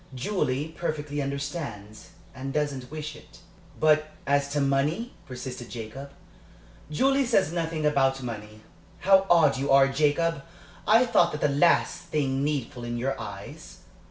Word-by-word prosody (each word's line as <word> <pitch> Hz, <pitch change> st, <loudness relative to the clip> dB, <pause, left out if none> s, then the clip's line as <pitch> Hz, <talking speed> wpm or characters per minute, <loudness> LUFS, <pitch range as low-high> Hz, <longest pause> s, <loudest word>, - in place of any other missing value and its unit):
Julie 140 Hz, -1 st, -1 dB
perfectly 150 Hz, -3 st, -3 dB
understands, 140 Hz, -7 st, -5 dB, 0.2 s
and 135 Hz, +2 st, -5 dB
doesn't 140 Hz, -4 st, -2 dB
wish 155 Hz, 0 st, -6 dB
it." 150 Hz, -, -16 dB, 0.4 s
"But 155 Hz, 0 st, +4 dB, 0.2 s
as 140 Hz, 0 st, +2 dB
to 145 Hz, +1 st, -1 dB
money?" 145 Hz, -, 0 dB
persisted 125 Hz, -1 st, -7 dB
Jacob. 120 Hz, +4 st, -7 dB, 0.8 s
"Julie 270 Hz, -, +2 dB
says 195 Hz, -, +2 dB
nothing 165 Hz, -2 st, -2 dB
about 135 Hz, -2 st, +2 dB
money. 110 Hz, -2 st, -7 dB, 0.4 s
How 195 Hz, 0 st, +5 dB
odd 170 Hz, -5 st, +5 dB
you 140 Hz, +2 st, -2 dB
are, 135 Hz, 0 st, +6 dB
Jacob! 150 Hz, +3 st, +1 dB, 0.5 s
I 225 Hz, +4 st, +6 dB
thought 240 Hz, -, +3 dB
that 150 Hz, -, -4 dB
was 150 Hz, -, +3 dB
the -, -, -2 dB
last 170 Hz, +4 st, +3 dB
thing 135 Hz, -3 st, -1 dB
needful 140 Hz, -5 st, -2 dB
in 120 Hz, 0 st, -3 dB
your 135 Hz, +3 st, -1 dB
eyes." -, -, -9 dB
140 Hz, 145 wpm, -26 LUFS, 135-155 Hz, 0.8 s, are